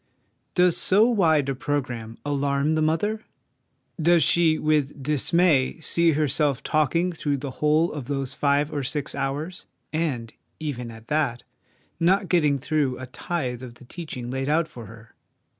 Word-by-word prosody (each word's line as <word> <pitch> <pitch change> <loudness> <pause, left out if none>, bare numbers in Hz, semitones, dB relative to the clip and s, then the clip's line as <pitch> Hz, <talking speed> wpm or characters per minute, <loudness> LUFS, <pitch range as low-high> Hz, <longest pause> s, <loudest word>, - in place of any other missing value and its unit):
Does 180 -1 +4
so 210 +4 +4
wide 160 - +3
a 135 - 0
programme 125 -5 -3
alarm 140 +1 0
the 155 - +1
mother? 185 +8 0 0.8
Does 170 +1 +5
she 165 -2 +3
with 150 -3 0
dismay 150 0 +2
see 165 +1 +2
herself 145 -2 +1
talking 165 +4 +1
through 145 -3 -1
the 135 0 -5
whole 155 +3 +3
of 145 -4 -5
those 135 -1 -3
five 145 +1 +1
or 145 - -1
six 140 +2 -2
hours, 145 +6 -4 0.3
and, 135 -8 -2 0.3
even 130 -6 -4
at 115 0 -12
that, 145 -6 0 0.6
not 185 +3 +2
getting 150 -5 +3
through 140 -1 0
a 130 - -7
tithe 130 -2 -4
of 125 -2 -9
the 125 - -16
teach 160 +1 -7
ing 120 0 -5
laid 135 +1 -2
out 160 +2 +2
for 120 -7 -10
her? 115 +1 -14
145 Hz, 160 wpm, -24 LUFS, 130-160 Hz, 0.8 s, Does